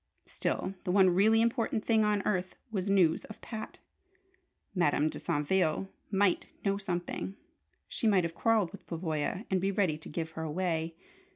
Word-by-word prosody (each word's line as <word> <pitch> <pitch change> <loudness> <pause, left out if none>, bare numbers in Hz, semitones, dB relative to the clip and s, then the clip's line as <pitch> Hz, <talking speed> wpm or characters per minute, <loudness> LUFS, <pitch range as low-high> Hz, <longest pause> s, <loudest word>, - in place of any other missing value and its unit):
Still, 190 - -2
the - - -4
one 185 0 +5
really 220 +5 +5
important 230 -2 0
thing 220 -2 +4
on 210 -2 +1
earth 185 -3 -1 0.2
was 195 -2 -2
news 180 -5 +4
of 215 - -11
Pat. 220 -2 -7 1.0
Madame 155 -4 +2
de - - -6
Saintville 160 +4 +1 0.2
might 195 -2 +2 0.2
know 200 0 +1
something! 185 0 -3 0.5
She 225 - -1
might 195 -4 +4
have 170 -1 -2
quarrelled 215 -1 +2
with - - -12
Pavoya, 165 +3 -2
and 185 -1 +2
be 195 - +1
ready 185 -7 +1
to - - -9
"give 160 +1 -4
her 160 - -6
away." 165 0 -1
185 Hz, 165 wpm, -31 LUFS, 165-205 Hz, 1.0 s, one